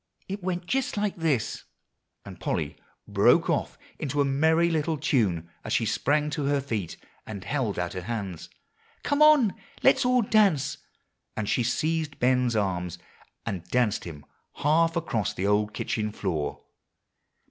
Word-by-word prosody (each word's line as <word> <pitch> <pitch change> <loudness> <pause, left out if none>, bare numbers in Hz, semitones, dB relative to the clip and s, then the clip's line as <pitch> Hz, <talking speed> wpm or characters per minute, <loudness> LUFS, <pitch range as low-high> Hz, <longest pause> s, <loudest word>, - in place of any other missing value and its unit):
it 195 +1 -5
went 180 -1 -3
just 260 +1 -1
like 205 -1 0
this," 155 -9 -1 0.6
and - - -10
Polly - - -2 0.3
broke - - +4
off - - -1 0.2
into 145 -1 -2
a 140 - +4
merry 160 +5 +3
little 160 0 0
tune 105 - +1 0.2
as - - -3
she 115 - +2
sprang 145 +8 +1
to 145 0 -2
her 140 0 +2
feet 110 - -4 0.3
and 100 -3 -6
held 120 -1 -1
out 85 -1 -2
her 90 - -4
hands, 100 -4 -5 0.5
"Come 285 +1 0
on, 300 -9 +6 0.3
let 270 - +6
us 265 - 0
all 250 -1 +4
dance!" 195 -11 +2 0.6
and 105 - -2
she 125 - +1
seized 155 +5 -1
Ben's 125 -1 +2
arms, 90 -4 -1 0.5
and 95 -4 -3
danced 110 +2 +1
him 75 -4 -9 0.3
half 165 +3 +2
across 120 - -1
the 95 - -2
old 105 +1 +2
kitchen 105 0 -2
floor. 85 -8 -3
135 Hz, 155 wpm, -27 LUFS, 105-165 Hz, 0.6 s, on